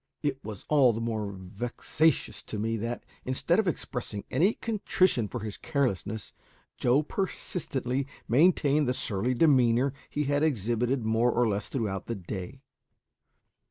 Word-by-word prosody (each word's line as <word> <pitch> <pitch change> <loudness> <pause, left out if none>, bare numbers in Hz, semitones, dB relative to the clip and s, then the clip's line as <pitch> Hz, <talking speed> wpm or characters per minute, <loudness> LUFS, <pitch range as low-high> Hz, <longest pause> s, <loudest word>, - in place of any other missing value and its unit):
It 135 -2 -1
was 105 -3 -7
all 135 -6 +5
the 110 - -3
more 110 -3 -2
vexatious 105 - -1
to 110 - -5
me 115 +2 -1
that, 115 +3 -4 0.2
instead 130 +8 +1
of 215 - +1
expressing 125 -10 -3
any 180 - +3
contrition 190 - +1
for 120 +2 -5
his 105 -1 -5
carelessness, 110 - -2 0.4
Joe 130 +5 +3
persistently 140 -7 -2 0.2
maintained 150 +1 +4
the 125 - +1
surly 115 +4 0
demeanour 130 -2 +4 0.2
he 150 - -1
had 145 0 +1
exhibited 120 -2 +1
more 115 +2 +3
or 120 0 +2
less 100 -1 -2
throughout 105 -7 -2
the 115 - -2
day. 100 +7 -7
125 Hz, 140 wpm, -28 LUFS, 110-145 Hz, 0.4 s, all